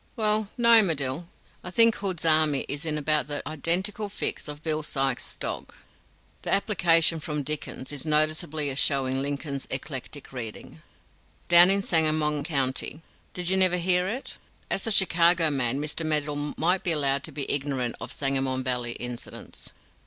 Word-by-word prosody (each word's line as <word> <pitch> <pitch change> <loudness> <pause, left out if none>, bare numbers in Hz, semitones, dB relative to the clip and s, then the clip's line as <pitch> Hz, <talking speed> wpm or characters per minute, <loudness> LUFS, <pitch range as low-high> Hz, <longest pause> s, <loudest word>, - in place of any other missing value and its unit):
"Well, 215 -2 +1
no, 235 -2 +6
Medill; 160 -3 -1 0.4
I - - -6
think 230 +4 +5
Hood's 185 -6 -4
army 155 -3 +3
is 145 +3 -4
in 155 -1 -1
about 150 -2 0
the 145 -1 -5
identical 185 +8 0
fix 195 - -3
of 150 +1 -9
Bill 155 -1 -1
Sykes' 135 -4 -2
dog - - -6 0.7
(the - - -4
application 170 -5 +3
from 150 -1 -4
Dickens 150 -2 -5
is 145 -3 -6
noticeable 155 0 0
as 140 -2 -1
showing 135 -2 +1
Lincoln's 140 0 -4
eclectic 135 +1 -6
reading) 115 -4 -7 0.7
down 175 +1 +9
in 195 0 +2
Sangamon 155 -3 +1
County. 140 0 -2 0.3
Did 180 0 -2
you 190 - +2
never 185 -1 +5
hear 180 +1 +3
it?" 245 +7 -5 0.3
As 195 - -2
a - - -1
Chicago 170 -4 +3
man 135 -1 0
Mr. 150 +2 -3
Medill 150 -1 -1
might 180 +3 +1
be 175 - +2
allowed 140 -2 +1
to 160 - -5
be 140 -1 -3
ignorant 135 -4 -1
of - - -7
Sangamon 135 -2 -1
Valley 125 -2 -2
incidents. 120 0 -8
155 Hz, 160 wpm, -25 LUFS, 140-175 Hz, 0.7 s, down